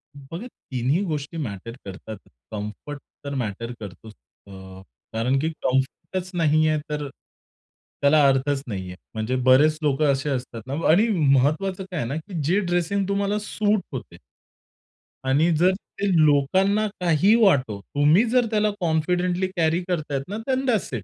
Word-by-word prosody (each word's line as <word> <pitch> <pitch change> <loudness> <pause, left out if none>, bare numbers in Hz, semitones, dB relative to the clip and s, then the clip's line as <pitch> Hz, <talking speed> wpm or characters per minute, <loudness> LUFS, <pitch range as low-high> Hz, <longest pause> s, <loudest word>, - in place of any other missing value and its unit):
बघा, 165 - -8
तिन्ही 130 - -2
गोष्टी 155 -1 -4
मॅटर 115 - -5
करतात. 100 +3 -8 0.3
कम्फर्ट 110 +7 -6 0.3
तर 140 - -4
मॅटर 115 -1 -3
करतोच. 105 +1 -10 0.3
अ, - - -13 0.6
कारण 120 +4 +1
की 155 +3 0
कम्फर्टच 165 +8 -1
नाही 155 -2 +3
आहे, 155 -1 +1
तर 150 -1 -3 0.9
त्याला 140 0 +5
अर्थच 135 +1 +1
नाही 95 -5 -4
आहे. 90 - -8 0.2
म्हणजे 110 +3 -2
बरेच 145 +4 +5
लोकं 145 0 +2
असे 135 +2 -1
असतात 125 -4 -4
ना 135 - -4 0.2
आणि 195 +9 +5 0.3
महत्त्वाचं 155 +9 +1
काय 175 - -3
आहे 115 - -2
ना, 140 - -2
की 165 +1 -5
जे 175 +8 +2
ड्रेसिंग 180 +1 0
तुम्हाला 200 +1 0
सूट 210 0 0
होते 120 -9 -7 1.1
आणि 145 +6 +3
जर 180 +2 +5 0.3
ते 200 - 0 0.2
लोकांना 190 +9 +3
काही 175 +4 +4
वाटो, 130 - +3
तुम्ही 145 - +3
जर 250 0 +3
त्याला 215 -1 +2
कॉन्फिडेंटली 180 +2 0
कॅरी 165 0 +2
करतायत 155 -6 -2
ना, 205 - -4
देन 265 0 0
दॅट्स 225 - 0
इट. 115 -6 -3
150 Hz, 150 wpm, -24 LUFS, 130-185 Hz, 1.1 s, त्याला